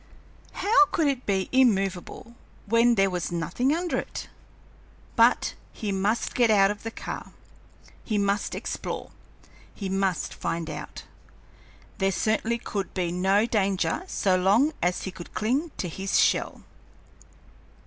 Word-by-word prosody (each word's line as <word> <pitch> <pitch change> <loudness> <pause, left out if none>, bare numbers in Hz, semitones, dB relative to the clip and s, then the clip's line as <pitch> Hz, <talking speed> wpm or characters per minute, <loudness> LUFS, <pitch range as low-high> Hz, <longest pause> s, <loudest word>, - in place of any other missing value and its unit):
How 395 -1 +4
could 335 -5 0
it 265 -2 -2
be 190 -2 +1
immovable 205 -3 +1 0.3
when 230 +2 +4
there 195 -2 +3
was 180 -2 -3
nothing 170 - 0
under 345 +3 0
it? - - -7 0.9
But - - +4 0.2
he 210 -3 -3
must 200 +4 0
get 240 -2 +3
out 200 -2 +5
of 205 - -7
that 225 0 -6
car, - - -6 0.7
he 215 - -1
must 200 0 0
explore, - - -5 0.6
he 195 -2 -4
must 195 -1 -1
find 165 -1 -3
out. 150 0 -8 1.0
There 195 0 +2
certainly 220 +4 0
could 200 -4 -5
be 180 -3 -1
no 190 +4 +2
danger 200 - 0
so 190 - +1
long 205 +12 +3
as 180 +1 0
he 190 - -4
could 175 -2 -11
cling 260 +10 0
to 180 - -2
his 190 +3 0
shell. - - +1
200 Hz, 140 wpm, -26 LUFS, 190-235 Hz, 1.0 s, out